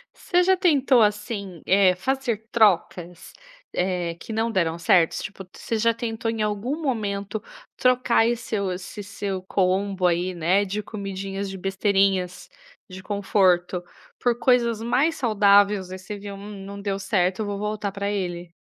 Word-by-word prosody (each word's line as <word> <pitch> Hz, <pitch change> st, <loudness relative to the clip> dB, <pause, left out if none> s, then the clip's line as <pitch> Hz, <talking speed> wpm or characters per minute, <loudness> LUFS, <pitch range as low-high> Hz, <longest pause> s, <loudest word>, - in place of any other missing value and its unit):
Você 355 Hz, 0 st, +1 dB
já 375 Hz, +1 st, +3 dB
tentou 275 Hz, -8 st, +4 dB
assim, 210 Hz, -4 st, -1 dB
eh, 190 Hz, -1 st, +5 dB
fazer 230 Hz, 0 st, -2 dB
trocas? 180 Hz, -5 st, +1 dB, 0.4 s
Eh, 180 Hz, -2 st, -1 dB
que 220 Hz, -, -7 dB
não 225 Hz, +1 st, 0 dB
deram 170 Hz, -5 st, 0 dB
certo? 170 Hz, 0 st, +4 dB
Tipo, 200 Hz, -2 st, -7 dB
tis 180 Hz, -, -16 dB
você 230 Hz, -, -2 dB
já 230 Hz, +1 st, +3 dB
tentou 225 Hz, -1 st, -3 dB
em 225 Hz, -1 st, -3 dB
algum 215 Hz, +9 st, -2 dB
momento, 215 Hz, -6 st, -2 dB, 0.4 s
trocar 250 Hz, -1 st, +2 dB
aí 235 Hz, +2 st, +4 dB
seu, 200 Hz, -5 st, -3 dB
esse 180 Hz, +3 st, -7 dB
seu 195 Hz, -2 st, -4 dB
combo 190 Hz, 0 st, +1 dB
aí, 175 Hz, +2 st, 0 dB
né, 180 Hz, +4 st, +2 dB
de 205 Hz, +2 st, -3 dB
comidinhas, 195 Hz, -1 st, -5 dB
de 195 Hz, -, -6 dB
besteirinhas, 195 Hz, -1 st, 0 dB, 0.4 s
de 190 Hz, 0 st, -10 dB
conforto, 185 Hz, -3 st, +1 dB, 0.4 s
por 240 Hz, -1 st, +1 dB
coisas 235 Hz, -3 st, +2 dB
mais 270 Hz, +8 st, +1 dB
saudáveis, 205 Hz, -, +3 dB
ai 185 Hz, -, -6 dB
você 205 Hz, +2 st, -7 dB
viu: 200 Hz, 0 st, -8 dB
"Hum 200 Hz, -1 st, -9 dB
não 200 Hz, 0 st, -8 dB
deu 200 Hz, -1 st, -2 dB
certo. 190 Hz, -2 st, +1 dB
Então 215 Hz, -, -3 dB
eu -, -, -4 dB
vou 200 Hz, -, -4 dB
voltar 210 Hz, -1 st, -3 dB
pra 200 Hz, +1 st, -3 dB
ele?". 175 Hz, -4 st, -3 dB
200 Hz, 165 wpm, -24 LUFS, 185-225 Hz, 0.4 s, eh